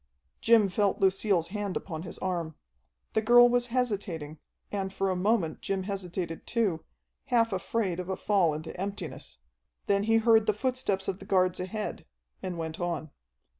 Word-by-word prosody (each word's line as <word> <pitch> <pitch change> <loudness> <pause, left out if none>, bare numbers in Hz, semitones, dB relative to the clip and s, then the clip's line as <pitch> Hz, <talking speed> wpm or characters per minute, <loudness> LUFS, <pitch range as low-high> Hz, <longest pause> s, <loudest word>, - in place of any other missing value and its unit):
Jim 225 -3 +5
felt 200 +1 +1
Lucille's 190 -3 +2
hand 205 -1 -2
upon 160 -4 -6
his 170 - -7
arm. 170 -4 -3 0.6
The 220 - +2
girl 240 +2 +7
was 245 0 +2
hesitating, 200 - -2 0.3
and 195 -2 -2
for 195 0 0
a - - 0
moment 185 -3 +1
Jim 195 -1 -2
hesitated 185 -4 -4
too, 205 -9 0 0.4
half 230 -3 +2
afraid 190 -1 -1
of 180 0 -5
a 190 - -1
fall 185 -7 +2
into 155 +1 -7
emptiness. 155 - -5 0.5
Then 200 0 +2
he 225 0 +3
heard 225 -1 +4
the 215 - +4
footsteps 245 -6 -1
of 195 0 -2
the - - -10
guards 185 -2 +2
ahead, 210 +4 -4 0.3
and 180 -2 -4
went 160 -1 -4
on. 170 -3 -3
195 Hz, 165 wpm, -29 LUFS, 175-215 Hz, 0.6 s, girl